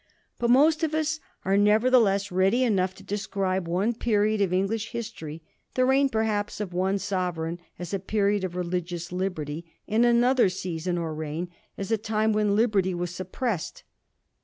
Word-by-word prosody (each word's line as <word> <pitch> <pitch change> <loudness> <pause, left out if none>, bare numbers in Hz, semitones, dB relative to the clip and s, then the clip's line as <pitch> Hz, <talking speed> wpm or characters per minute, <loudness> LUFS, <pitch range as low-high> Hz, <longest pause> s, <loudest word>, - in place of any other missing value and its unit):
But 235 - +1
most 300 +6 +5
of 315 -1 0
us 315 0 0 0.3
are, 195 +1 +2
nevertheless, 210 -1 +4
ready 190 +7 +3
enough 190 -6 +1
to 195 - -14
describe 195 -2 -2
one 190 +7 +1
period 215 -2 +1
of 195 -3 +2
English 205 +4 -1
history, 165 -9 -6 0.3
the 255 - +3
reign 270 +1 +4
perhaps 220 -4 -1
of 200 -4 -4
one 190 +2 +1
sovereign, 180 -4 -2 0.2
as 175 +1 -6
a 195 - 0
period 205 +1 +1
of 180 -1 -3
religious 175 -1 -3
liberty, 170 -4 -3 0.2
and 220 +3 +3
another 240 -1 +4
season, 180 -1 -3
or 165 -2 -2
reign, 155 +3 -4 0.3
as 195 +2 -4
a 225 - +2
time 220 0 +1
when 210 -1 +2
liberty 205 -5 +2
was 175 0 -3
sup 185 0 -7
pressed. 230 -11 -3
195 Hz, 165 wpm, -26 LUFS, 180-220 Hz, 0.3 s, most